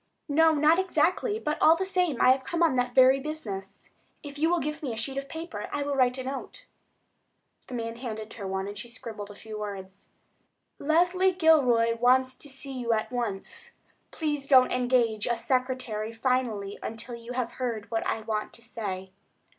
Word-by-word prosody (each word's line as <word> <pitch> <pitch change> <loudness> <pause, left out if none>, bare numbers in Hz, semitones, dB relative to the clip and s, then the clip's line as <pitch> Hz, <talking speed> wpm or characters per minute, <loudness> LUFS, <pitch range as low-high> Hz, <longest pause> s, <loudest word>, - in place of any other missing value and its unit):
"No, 320 +2 +4
not 305 +4 +4
exactly; 370 +5 +1
but, 305 -8 -3
all 320 - +7
the 380 +3 -2
same, 360 -8 0
I 255 - +6
have 260 0 +2
come 340 +5 0
on 320 -6 +3
that 250 -1 0
very 260 +1 +7
business. 220 -11 -6 0.4
If 285 -1 -8
you 320 +2 +3
will 350 - +3
give 300 0 -4
me 275 -5 -3
a - - -7
sheet 270 +4 -3
of 275 0 -9
paper 320 -11 -6
I 290 - -1
will 285 0 -2
write 250 -1 +3
a 260 - -4
note." 275 - -6 1.0
The 255 - -6
man 230 -1 -4
handed 220 -3 -6
her 200 -4 -6
one, 190 0 -2
and 205 - -6
she 215 +4 -7
scribbled 220 -4 -8
a 205 - -10
few 215 0 -8
words: 195 -2 -7 0.7
"Leslie 355 +5 +3
Gilroy 255 -10 +4
wants 255 +1 +4
to 290 - -11
see 270 0 -7
you 240 -3 0
at 215 +2 -1
once. 230 -6 -4 0.3
Please 295 -3 -2
don't 260 -2 +6
engage 245 -4 +1
a 235 - +1
secretary 250 -3 -1
finally 230 -4 -1
until 225 +2 -5
you 235 +1 -7
have 245 -2 -2
heard 230 -3 -3
what 225 - 0
I 220 - -1
want 215 -1 -3
to - - -13
say." 195 -6 -5
255 Hz, 190 wpm, -28 LUFS, 225-295 Hz, 1.0 s, all